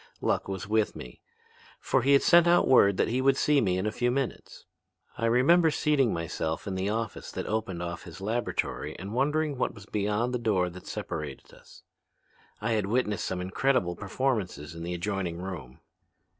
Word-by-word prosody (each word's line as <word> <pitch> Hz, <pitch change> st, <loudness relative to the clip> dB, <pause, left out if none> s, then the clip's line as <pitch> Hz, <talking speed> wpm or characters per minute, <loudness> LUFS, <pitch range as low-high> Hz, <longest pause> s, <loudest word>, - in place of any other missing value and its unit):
Luck -, -, 0 dB
was 95 Hz, 0 st, -5 dB
with 110 Hz, 0 st, +1 dB
me, -, -, -10 dB, 0.6 s
for 135 Hz, -, +1 dB
he 140 Hz, +3 st, +5 dB
sent 170 Hz, +4 st, +5 dB
out 175 Hz, +1 st, +4 dB
word 100 Hz, -7 st, +5 dB
that -, -, +2 dB
he 125 Hz, +3 st, 0 dB
would 135 Hz, 0 st, +3 dB
see 150 Hz, -2 st, +3 dB
me 90 Hz, -4 st, +1 dB
in 95 Hz, -, -1 dB
a 105 Hz, -, 0 dB
few 120 Hz, +2 st, 0 dB
minutes. 130 Hz, 0 st, -3 dB, 0.5 s
I 115 Hz, -, 0 dB
remember 160 Hz, +9 st, +5 dB
seating 145 Hz, -6 st, +2 dB
myself 80 Hz, +1 st, -3 dB
in 100 Hz, -, -3 dB
the 95 Hz, +2 st, -1 dB
office 110 Hz, 0 st, -3 dB
that -, -, -4 dB
opened 105 Hz, -6 st, -2 dB
off 85 Hz, +1 st, -6 dB
his 85 Hz, 0 st, -10 dB
laboratory 110 Hz, +5 st, -2 dB
and 100 Hz, +3 st, -7 dB
wondering 145 Hz, +2 st, 0 dB
what -, -, -1 dB
was 100 Hz, -2 st, -12 dB
beyond 105 Hz, +4 st, -1 dB
the 125 Hz, -, 0 dB
door 95 Hz, -6 st, +1 dB
that 90 Hz, +1 st, -12 dB
separated -, -, -6 dB
us. -, -, -17 dB, 0.8 s
I 110 Hz, +2 st, -1 dB
had 105 Hz, -3 st, +1 dB
witnessed 105 Hz, -2 st, 0 dB
some 90 Hz, -1 st, -3 dB
incredible 95 Hz, 0 st, +1 dB
performances 100 Hz, -, -2 dB
in 85 Hz, -, -8 dB
the 85 Hz, +1 st, -3 dB
adjoining 90 Hz, -1 st, -2 dB
room. 85 Hz, -9 st, -7 dB
105 Hz, 185 wpm, -28 LUFS, 95-130 Hz, 0.8 s, he